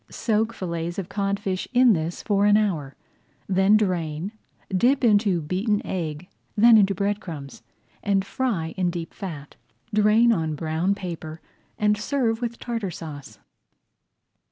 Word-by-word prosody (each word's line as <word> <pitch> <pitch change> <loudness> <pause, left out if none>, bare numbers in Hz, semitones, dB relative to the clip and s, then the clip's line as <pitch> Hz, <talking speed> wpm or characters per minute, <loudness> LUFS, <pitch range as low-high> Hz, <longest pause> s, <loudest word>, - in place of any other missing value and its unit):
Soak 220 0 0
fillets 170 -4 -4
of 195 -2 -4
codfish 200 -2 -2
in 250 -2 +6
this 165 -1 -3
for 205 -1 +2
an 205 0 +6
hour, 165 -11 -1 0.5
then 190 +2 +4
drain, 175 -3 -1 0.4
dip 255 +8 +3
into 205 -6 +3
beaten 200 +7 0
egg, 165 -2 -4 0.3
then 230 +2 +7
into 200 -2 +4 0.2
crumbs, 160 -9 -9 0.4
and 195 -2 +1
fry 200 -11 -2
in 180 -2 +1
deep 170 -1 -5
fat. 155 -8 -8 0.4
Drain 215 +3 +5
on 160 -5 -1
brown 165 +5 0
paper 165 -4 -7 0.4
and 210 0 +2
serve 230 -1 0
with 235 -1 -3
Tartar 230 -5 -3
Sauce. 145 -9 -9
195 Hz, 130 wpm, -24 LUFS, 165-215 Hz, 0.5 s, then